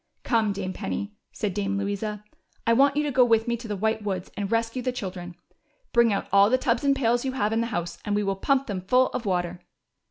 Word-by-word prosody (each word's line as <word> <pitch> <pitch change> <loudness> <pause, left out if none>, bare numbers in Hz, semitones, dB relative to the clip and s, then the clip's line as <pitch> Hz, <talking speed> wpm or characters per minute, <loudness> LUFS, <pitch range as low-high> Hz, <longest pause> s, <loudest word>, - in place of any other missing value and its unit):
" - - -47
Come, 225 -4 +2
Dame 190 -2 -4
Penny," 205 +1 -4 0.2
said 210 -4 -3
Dame 200 0 -1
Louisa, 205 +1 -3 0.2
'' - - -40
I 230 - +4
want 275 +3 +4
you 300 - +2
to 295 - -1
go 255 -1 +5
with 225 -1 +3
me 235 - +1
to 230 0 -9
the 210 - -2
White 220 +2 0
Woods 190 -3 -3
and 200 0 -3
rescue 230 +2 0
the 255 +1 -1
children. 180 -6 -6 0.6
Bring 235 -1 +5
out 200 - -1
all 200 +1 +6
the 255 - +4
tubs 240 -1 0
and 280 -1 +3
pails 240 -2 +1
you 265 -1 -2
have 220 -5 0
in 225 - +1
the 230 - -1
house, 175 -6 -4
and 205 - -1
we 210 - +1
will 195 -1 0
pump 275 +7 +1
them 195 -6 -4
full 255 +7 +3
of 230 - -4
water." 180 -1 -1
215 Hz, 255 wpm, -26 LUFS, 195-240 Hz, 0.6 s, all